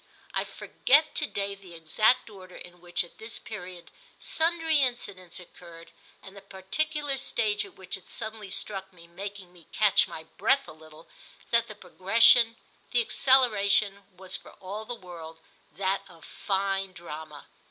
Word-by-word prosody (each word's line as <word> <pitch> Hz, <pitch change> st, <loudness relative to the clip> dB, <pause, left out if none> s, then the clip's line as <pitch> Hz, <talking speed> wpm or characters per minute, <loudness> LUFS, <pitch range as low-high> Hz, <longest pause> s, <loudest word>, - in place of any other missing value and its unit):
I -, -, 0 dB
forget 305 Hz, +4 st, +2 dB
to 300 Hz, -, +1 dB
day 200 Hz, -4 st, -2 dB
the 190 Hz, -3 st, -13 dB
exact 215 Hz, +10 st, +2 dB
order 190 Hz, -4 st, -12 dB
in 175 Hz, 0 st, -12 dB
which, 175 Hz, 0 st, -1 dB
at 175 Hz, -, -16 dB
this 220 Hz, +1 st, -3 dB
period, 180 Hz, -5 st, -9 dB, 0.3 s
sundry 325 Hz, -1 st, +1 dB
incidents 200 Hz, -10 st, -1 dB
occurred 170 Hz, -1 st, -13 dB, 0.3 s
and 195 Hz, 0 st, -12 dB
the 200 Hz, -, -10 dB
particular 275 Hz, +10 st, -2 dB
stage 215 Hz, -5 st, +1 dB
at -, -, -15 dB
which 190 Hz, -1 st, -4 dB
it 190 Hz, -, -17 dB
suddenly 220 Hz, -2 st, -4 dB
struck 195 Hz, 0 st, -3 dB
me, 170 Hz, -2 st, -14 dB
making 190 Hz, +1 st, -8 dB
me 170 Hz, -3 st, -18 dB
catch 210 Hz, -3 st, +4 dB
my 160 Hz, -, -8 dB
breath 215 Hz, +10 st, +1 dB
a -, -, -8 dB
little, 155 Hz, 0 st, -15 dB, 0.4 s
that 235 Hz, 0 st, +3 dB
the 215 Hz, -, -9 dB
progression, 225 Hz, +5 st, +5 dB, 0.3 s
the 240 Hz, -, +3 dB
acceleration, 210 Hz, -6 st, +3 dB
was 190 Hz, 0 st, -4 dB
for -, -, -8 dB
all 205 Hz, +3 st, -7 dB
the 245 Hz, -, -4 dB
world 170 Hz, -5 st, -10 dB, 0.4 s
that 195 Hz, +2 st, 0 dB
of 165 Hz, -2 st, -15 dB
fine 195 Hz, -1 st, -1 dB
drama. 155 Hz, -3 st, -9 dB
195 Hz, 155 wpm, -28 LUFS, 180-225 Hz, 0.4 s, progression